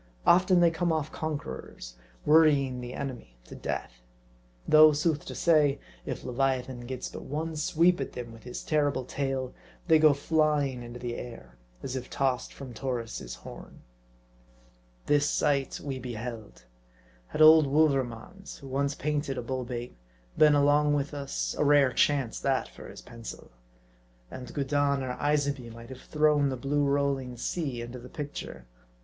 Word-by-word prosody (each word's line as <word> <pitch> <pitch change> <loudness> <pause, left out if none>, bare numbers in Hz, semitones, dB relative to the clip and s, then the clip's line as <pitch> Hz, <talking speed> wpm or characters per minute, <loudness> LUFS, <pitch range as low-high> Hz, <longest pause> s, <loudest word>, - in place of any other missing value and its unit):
Often 180 0 +5
they 170 -1 +5
come 170 +1 0
off 155 -2 -1
conquerors, 65 - -6 0.3
worrying 145 -5 +4
the 125 0 -7
enemy 120 - -6
to - - -13
death. - - -5 0.7
Though, 155 0 +8
sooth 150 0 0
to - - -7
say, 150 -4 +3 0.3
if - - -4
leviathan 130 -1 -1
gets 130 0 -4
but - - -8
one 160 +3 -4
sweep 170 +1 +2
at 135 - -5
them 120 -2 -7
with 115 - -13
his 125 +2 -7
terrible 145 -4 0
tail, 135 -1 -3 0.3
they 160 -2 +6
go 155 -2 +6
flying 145 -3 +1
into 120 0 -8
the 120 -1 -4
air, 115 - -9 0.3
as 130 - -4
if 125 -1 -5
tossed 130 -2 -1
from 135 -3 -9
Taurus' 115 - -4
horn. - - -12 1.2
This 145 0 +3
sight 140 -2 0
we 135 -2 -5
beheld. 115 - -7 0.6
Had 155 - +2
old 155 -1 +8
Wouvermans, 140 - 0
who 135 - -11
once 140 +2 -1
painted 145 -2 -2
a - - -3
bull 130 +1 -3
bait, 120 0 -6 0.4
been 150 -1 +6
along 145 +1 +4
witlr 145 0 -2
us, 100 - -3
a - - +3
rare 145 -3 +4
chance, 140 -5 +1
that, 135 -1 0
for - - -12
his - - -11
pencil. 115 -2 -10 0.8
And 125 -1 -8
Gudin 140 -1 0
or 125 -1 -3
Isabey 140 -4 0
might 115 +1 -11
have 130 0 -10
thrown 150 -2 +2
the 130 - -3
blue 145 +3 0
rolling 140 -3 0
sea 130 -3 -3
into 120 +1 -8
the 125 +1 -11
picture. 145 - -7
140 Hz, 155 wpm, -28 LUFS, 125-150 Hz, 1.2 s, Though